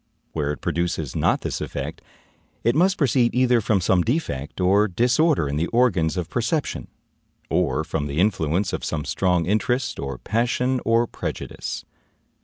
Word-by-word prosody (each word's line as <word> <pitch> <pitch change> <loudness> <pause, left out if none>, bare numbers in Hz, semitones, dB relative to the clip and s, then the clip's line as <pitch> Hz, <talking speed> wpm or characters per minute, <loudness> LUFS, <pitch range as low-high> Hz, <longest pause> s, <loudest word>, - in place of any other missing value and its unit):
Where 75 -2 -1
it 75 - -6
produces 80 -4 -2
not - - +2
this - - -3
effect, - - -5 0.6
it 115 - +3
must 180 +5 +3
proceed 125 -5 +2
either 125 -2 +4
from 105 -2 +2
some 90 +1 +3
defect 85 - -2
or 100 +3 +4
disorder 125 - +2
in 70 +1 -2
the 85 +3 0
organs 95 -9 +2
of 90 -3 -2
perception, 125 - -2 0.6
or 80 - +1
from 80 -3 -3
the 70 +1 -5
influence 90 -1 +1
of - - -3
some 75 -2 -2
strong 90 -3 +1
interest, 110 +7 0
or 70 -2 -4
passion, 125 - 0
or 115 +1 +3
prejudice. - - -5
100 Hz, 155 wpm, -23 LUFS, 80-120 Hz, 0.6 s, either